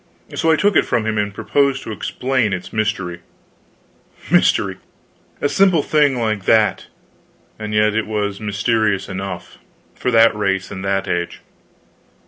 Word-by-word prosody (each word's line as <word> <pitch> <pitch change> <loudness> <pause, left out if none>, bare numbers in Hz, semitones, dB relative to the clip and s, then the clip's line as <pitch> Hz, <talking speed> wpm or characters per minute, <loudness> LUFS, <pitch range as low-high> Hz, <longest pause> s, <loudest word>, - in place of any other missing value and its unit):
So 165 - 0
I 160 - +5
took 205 +5 +2
it - - +5
from 110 - 0
him 110 -1 0
and 105 0 -1
proposed 135 +6 0
to - - -6
explain 120 0 -1
its 90 -1 -6
mystery. 100 -5 -2 1.1
Mystery! - - +3 0.6
a - - +1
simple 185 0 +3
little - - -14
thing 145 -4 +3
like 110 -4 -1
that; 110 -1 +2 0.7
and 105 -1 -5
yet 105 0 +2
it 110 0 -1
was 105 -2 -2
mysterious 105 -1 0
enough, 95 -2 -6 0.3
for - - -2
that 115 -2 +5
race 95 -2 -1
and 95 - -6
that 95 0 -1
age. 85 0 -3
105 Hz, 150 wpm, -19 LUFS, 100-120 Hz, 1.1 s, I